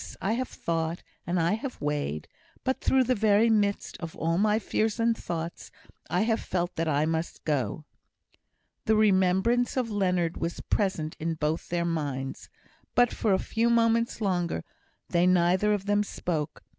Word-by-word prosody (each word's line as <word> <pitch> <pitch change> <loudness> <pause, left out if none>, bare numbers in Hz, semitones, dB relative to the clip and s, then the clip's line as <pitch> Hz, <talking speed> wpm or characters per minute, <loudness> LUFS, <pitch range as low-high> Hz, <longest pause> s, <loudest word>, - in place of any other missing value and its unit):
I 195 - -1
have 255 +2 -1
thought, 165 0 -3 0.2
and 175 +1 +1
I 170 +4 +2
have 245 +4 -4
weighed. 145 - -2 0.4
But 260 - -1
through 265 -1 +3
the 255 +1 +2
very 220 0 +4
midst 205 -2 0
of 165 -1 -6
all 165 +2 0
my 210 +1 +3
fears 220 +1 -1
and 230 0 +3
thoughts 170 -4 -5 0.4
I 180 - +1
have 225 +1 +1
felt 175 -1 -2
that 165 0 -1
I 150 0 +2
must 160 +1 -3
go." 145 -1 -1 1.0
The 220 - +3
remembrance 210 +4 +3
of 240 -3 0
Leonard 180 -4 0
was 170 +1 -3
present 170 -6 -1
in 165 +1 -1
both 155 +1 -2
their 170 0 0
minds; 140 -5 -3 0.5
but 245 -1 +4
for 215 - 0
a 190 - +4
few 230 +4 0
moments 230 0 +2
longer 175 - 0 0.5
they 175 +1 +3
neither 185 +3 +3
of 205 -2 0
them 205 0 +2
spoke. 160 -7 -4
185 Hz, 165 wpm, -28 LUFS, 165-220 Hz, 1.0 s, very